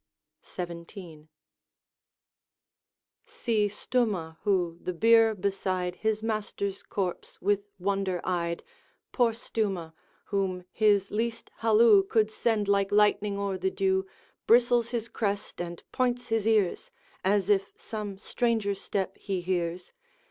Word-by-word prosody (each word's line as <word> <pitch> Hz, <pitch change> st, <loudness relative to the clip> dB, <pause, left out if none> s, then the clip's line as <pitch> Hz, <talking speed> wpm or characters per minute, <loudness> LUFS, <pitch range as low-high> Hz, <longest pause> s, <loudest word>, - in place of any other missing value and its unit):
XVII. 170 Hz, -2 st, -8 dB, 2.0 s
See 220 Hz, -4 st, 0 dB
Stumah, 205 Hz, -6 st, -1 dB
who, 180 Hz, -5 st, 0 dB
the 180 Hz, -, -3 dB
bier 225 Hz, +3 st, +5 dB
beside 185 Hz, -2 st, -2 dB
His 220 Hz, 0 st, -1 dB
master's 210 Hz, -3 st, -2 dB
corpse 185 Hz, -3 st, -4 dB
with 205 Hz, +1 st, 0 dB
wonder 195 Hz, -1 st, -1 dB
eyed, 170 Hz, -2 st, -1 dB, 0.5 s
Poor 240 Hz, -3 st, +3 dB
Stumah! 200 Hz, -7 st, -3 dB, 0.3 s
whom 190 Hz, -3 st, -1 dB
his 205 Hz, -3 st, +3 dB
least 230 Hz, +2 st, -2 dB
halloo 220 Hz, -2 st, +6 dB
Could 215 Hz, +2 st, +1 dB
send 215 Hz, -2 st, 0 dB
like 200 Hz, -1 st, +2 dB
lightning 210 Hz, -1 st, +3 dB
o'er 200 Hz, -2 st, -2 dB
the 190 Hz, +1 st, +1 dB
dew, 190 Hz, 0 st, 0 dB, 0.4 s
Bristles 240 Hz, 0 st, +4 dB
his 235 Hz, -2 st, -3 dB
crest, 205 Hz, -4 st, -3 dB
and 175 Hz, -1 st, -6 dB
points 245 Hz, -1 st, 0 dB
his 225 Hz, -1 st, +1 dB
ears, 210 Hz, -5 st, +2 dB, 0.3 s
As 195 Hz, 0 st, +2 dB
if 200 Hz, -2 st, +2 dB
some 210 Hz, -3 st, -5 dB
stranger 220 Hz, -1 st, 0 dB
step 195 Hz, -1 st, -3 dB
he 195 Hz, -2 st, -2 dB
hears. 175 Hz, -1 st, -2 dB
200 Hz, 120 wpm, -28 LUFS, 185-220 Hz, 2.0 s, halloo